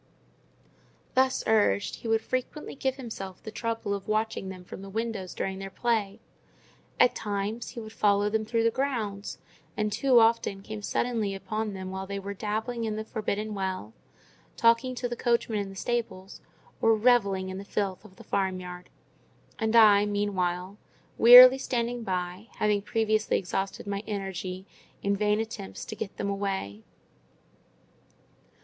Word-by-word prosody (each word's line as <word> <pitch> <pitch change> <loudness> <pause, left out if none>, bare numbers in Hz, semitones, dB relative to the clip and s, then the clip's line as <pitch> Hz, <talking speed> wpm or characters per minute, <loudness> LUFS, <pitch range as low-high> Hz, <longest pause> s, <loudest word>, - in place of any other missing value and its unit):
Thus 260 0 +2
urged, 210 -2 +2
he - - -8
would 225 0 +2
frequently 255 +4 -4
give 265 -1 -1
himself 205 -8 -8
the 215 - -7
trouble 225 -3 -2
of 200 -1 -5
watching 215 -2 -1
them 185 -1 -8
from 180 - -9
the 195 - -9
windows 220 -3 -4
during 190 0 -3
their 195 0 -6
play; 215 -2 -1 0.8
at 250 - +6
times, 210 +2 -3
he - - -8
would 220 -1 -9
follow 205 -1 +3
them 220 +1 0
through 230 +1 0
the 230 - +3
grounds, 220 -7 -3 0.4
and 210 0 0
too 245 +3 +4
often 225 -3 +2
came 215 0 -7
suddenly 215 -2 -1
upon 210 +2 -3
them 190 -1 -6
while 190 0 -5
they 200 0 -4
were 200 +1 -5
dabbling 220 +4 -3
in 220 -1 -2
the 215 - -3
forbidden 215 -1 -3
well, 190 - -4 0.6
talking 230 +2 +3
to 245 0 -2
the 240 - -4
coachman 235 -3 +1
in 200 -1 -3
the 195 - -10
stables, 195 -4 -3 0.4
or 225 0 +5
revelling 205 -5 +3
in 190 0 -5
the - - -7
filth 200 -2 -2
of 205 -3 -16
the - - -13
farm 190 -2 -1
yard—and 180 +5 -7
I, 210 -2 +7
meanwhile, 195 -2 -1 0.4
wearily 250 +2 +11
standing 240 -2 -2
by, 185 0 -3
having 210 -1 +1
previously 215 0 +1
exhausted 195 +1 -3
my 200 -1 -3
energy 190 -2 -4 0.4
in 200 0 +2
vain 210 +1 +1
attempts 220 -3 -6
to - - -6
get 215 - -6
them 200 - -1
away. 195 - -3
210 Hz, 155 wpm, -28 LUFS, 195-230 Hz, 0.8 s, wearily